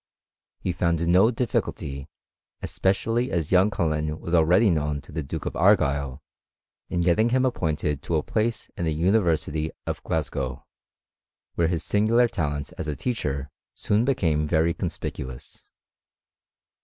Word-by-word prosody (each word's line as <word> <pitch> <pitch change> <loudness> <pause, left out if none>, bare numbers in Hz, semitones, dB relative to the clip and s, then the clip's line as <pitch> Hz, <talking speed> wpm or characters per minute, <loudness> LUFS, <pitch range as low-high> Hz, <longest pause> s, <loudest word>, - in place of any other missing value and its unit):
He 90 - -1
found 85 -1 0
no 95 +6 +5
difficulty, 75 - -2 0.6
especially 115 +6 0
as 80 -3 -1
young 95 +3 +5
OuUen 75 -5 -1
was 85 - -5
already 90 +6 +5
known 75 -2 0
to 70 - -15
the 80 +1 -3
Duke 75 +2 -5
of - - -3
Argyle, 70 -8 +2 0.7
in 85 - 0
getting 90 +7 +3
him 130 +2 +2
appointed 75 - -1
to 85 - -2
a 75 - +1
place 110 0 -1
in 85 - -2
the 80 -1 0
University 80 -4 +1 0.2
of - - -3
Glasgow, 70 -4 -3 0.9
where 85 - +1
his 85 -1 -1
singular 115 +4 +3
talents 75 - -3
as - - -3
a 75 - -2
teacher 70 - -3 0.2
soon 105 +2 +1
became 80 - +1
very 80 +1 +2
conspicuous. 65 -8 -6
85 Hz, 140 wpm, -25 LUFS, 75-100 Hz, 0.9 s, no